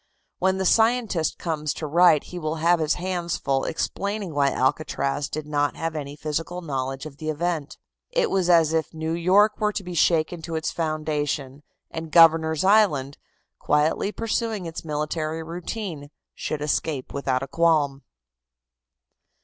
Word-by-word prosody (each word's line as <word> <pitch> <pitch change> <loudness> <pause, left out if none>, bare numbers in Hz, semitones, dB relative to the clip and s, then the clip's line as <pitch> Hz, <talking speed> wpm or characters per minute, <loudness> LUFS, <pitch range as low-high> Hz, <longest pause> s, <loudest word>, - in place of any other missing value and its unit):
When 190 0 +2
the 190 - -1
scientist 225 -7 +2
comes 155 -3 -2
to 155 - -5
write 160 0 +5
he 180 - -8
will 155 -1 -2
have 170 +2 +3
his 155 0 +1
hands 175 -1 -2
full 135 -1 0
explaining 200 +2 -3
why 140 -1 +3
Alcatraz 140 +1 -1
did 155 0 -4
not 145 -1 0
have 165 -1 -3
any 145 -1 -5
physical 155 +4 -4
knowledge 135 -2 -3
of 145 -2 -9
the 155 0 -4
event. 155 -1 -2 0.3
It - - 0
was 185 -2 +1
as 165 -2 +5
if 160 0 -1
New 160 +1 -2
York 190 +5 +3
were 210 -1 +1
to 205 - -4
be 180 -1 -7
shaken 165 0 +2
to 165 0 -5
its 160 - -1
foundation, 150 -4 -2 0.3
and 160 -1 -6
Governor's 160 -1 +5
Island, 190 -10 +3 0.4
quietly 150 +7 +1
pursuing 225 -3 -2
its 165 +1 -6
military 155 +1 -3
routine, 170 -2 -6 0.2
should 150 -1 -4
escape 150 -2 -2
without 135 -2 -1
a - - -5
qualm. 150 -3 +2
160 Hz, 155 wpm, -24 LUFS, 150-175 Hz, 0.4 s, write